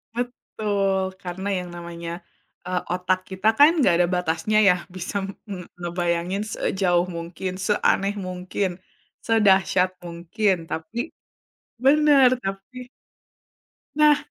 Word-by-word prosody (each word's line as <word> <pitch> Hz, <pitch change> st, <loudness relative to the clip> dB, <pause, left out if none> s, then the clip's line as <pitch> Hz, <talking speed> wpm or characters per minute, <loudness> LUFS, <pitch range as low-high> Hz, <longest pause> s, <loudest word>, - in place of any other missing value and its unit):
betul 205 Hz, -5 st, -1 dB, 0.2 s
karena 185 Hz, +2 st, -5 dB
yang 180 Hz, -1 st, -5 dB
namanya, 170 Hz, -1 st, -7 dB, 0.6 s
eee, 180 Hz, 0 st, -1 dB
otak 185 Hz, +1 st, +1 dB
kita 190 Hz, +3 st, -2 dB
kan 295 Hz, +2 st, +9 dB, 0.2 s
gak 175 Hz, -, +5 dB
ada 175 Hz, -, +4 dB
batasnya 180 Hz, +5 st, 0 dB
ya -, -, +7 dB, 0.2 s
bisa 185 Hz, +2 st, -6 dB, 0.3 s
me 195 Hz, -, -4 dB, 0.2 s
ngebayangin 175 Hz, +2 st, -1 dB
sejauh 180 Hz, -2 st, +1 dB
mungkin, 170 Hz, +2 st, -5 dB
seaneh 200 Hz, -1 st, +2 dB
mungkin, 185 Hz, +1 st, -2 dB, 0.6 s
sedahsyat 190 Hz, -4 st, +3 dB, 0.2 s
mungkin, 175 Hz, +4 st, 0 dB
tapi 160 Hz, +8 st, -6 dB, 0.9 s
bener 285 Hz, -2 st, +6 dB
tapi 195 Hz, +6 st, -6 dB, 1.1 s
Nah. 300 Hz, -1 st, +5 dB
190 Hz, 105 wpm, -23 LUFS, 175-210 Hz, 1.1 s, kan